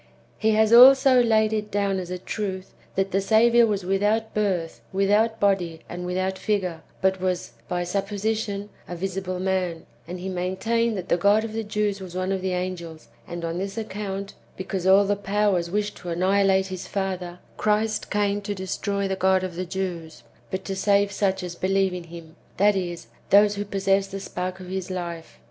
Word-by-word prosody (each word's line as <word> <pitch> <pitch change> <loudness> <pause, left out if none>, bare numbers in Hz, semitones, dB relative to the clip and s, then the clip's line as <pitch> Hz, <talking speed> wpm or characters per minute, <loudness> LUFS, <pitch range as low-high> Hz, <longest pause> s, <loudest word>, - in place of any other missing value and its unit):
He 220 0 +3
has 220 +1 +4
also 260 +1 +8
laid 220 -2 +3
it 210 -1 -2
down 200 -2 0
as 180 -1 -6
a 180 - -3
truth, 190 0 -5 0.2
that 195 0 0
the 195 - +1
Saviour 235 +3 +5
was 200 -3 -2
without 205 +4 +1
birth, 185 -6 -1
without 205 +4 +2
body, 180 -5 +1
and 180 0 -6
without 185 +1 -2
figure, 185 -6 -1 0.2
but 190 -1 +2
was, 185 -1 -1 0.2
by 175 0 -1
supposition, 205 +2 -2 0.2
a 175 - -5
visible 185 0 -3
man; 185 -3 -1 0.2
and 180 +1 -6
he 185 - -5
maintained 190 +5 -1
that 185 - -5
the - - +3
God 205 +4 +4
of 225 -1 -5
the 225 0 -2
Jews 210 -1 -1
was 180 -2 -8
one 185 +1 -1
of 190 -1 -1
the 185 0 -1
angels; 175 -3 -5 0.2
and, 170 0 -5
on 165 +1 -3
this 195 +2 -4
account, 200 -2 -4 0.2
because 185 0 -3
all 195 +1 +6
the 205 +1 +1
powers 200 -3 0
wished 205 +2 -2
to 175 - -8
annihilate 190 +2 +2
his 185 -1 -6
father, 185 -3 -3 0.2
Christ 215 +1 0
came 205 0 0
to 205 0 -4
destroy 200 +1 -2
the 190 - -1
God 190 0 +2
of 185 -2 -4
the 185 +1 -3
Jews, 175 -4 -5 0.3
but 190 0 -4
to 195 - -3
save 200 +1 +2
such 195 -2 0
as 175 -1 -5
believe 190 +1 +1
in 180 -1 -6
him; 165 -1 -11 0.2
that 205 +1 +4
is, 175 -3 -3 0.2
those 205 +1 +6
who 205 0 -4
possess 195 0 +1
the 195 0 -6
spark 185 -1 -5
of 185 - -9
his 190 0 -4
life. 170 -3 -6
195 Hz, 190 wpm, -24 LUFS, 180-205 Hz, 0.3 s, also